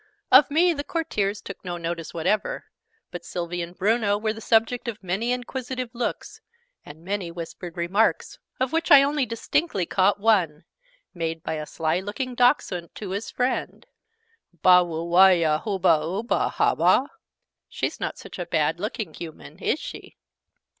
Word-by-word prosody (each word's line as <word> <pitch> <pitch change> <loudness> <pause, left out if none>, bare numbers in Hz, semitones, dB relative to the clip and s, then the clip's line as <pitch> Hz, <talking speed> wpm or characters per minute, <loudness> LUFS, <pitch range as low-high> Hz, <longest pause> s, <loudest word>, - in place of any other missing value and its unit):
Of 265 +4 +8
me 340 +4 +3
the 285 -2 -4
Courtiers 210 - -2
took 195 - -9
no 175 -2 -4
notice 165 -1 -4
whatever: 195 +5 -1 0.5
but 175 -1 -7
Sylvie 175 0 -4
and 170 +1 -7
Bruno 205 +1 +2
were 215 +1 -1
the 225 - -10
subject 230 +2 +1
of 215 -3 -5
many 195 +7 -1
inquisitive 250 0 -4
looks, 240 0 -4 0.4
and 160 +3 -13
many 195 -2 -2
whispered 170 +1 -8
remarks, 185 +6 0 0.2
of 260 +2 -1
which 330 0 0
I 275 -1 +9
only 280 -2 0
distinctly 230 - -1
caught 195 +3 +2
one 185 -8 +2 0.5
made 165 -2 -4
by - - -3
a 155 -1 -5
sly 160 +3 -1
looking 210 +7 -4
Dachshund 240 - +1
to 200 -3 -6
his 200 +4 -3
friend 250 +1 -2 0.8
"Bah 180 -1 +8
wooh 165 -1 -3
wahyah 170 -4 +5
hoobah 190 -7 +2
Oobooh, 195 +9 -1
hah - - +2
bah?" - - +3 0.6
("She's - - -3
not - - -3
such - - -10
a 175 - -4
bad 160 0 0
looking 210 -3 -4
Human, 160 -1 -10
is - - 0
she?") - - -9
195 Hz, 160 wpm, -24 LUFS, 170-235 Hz, 0.8 s, I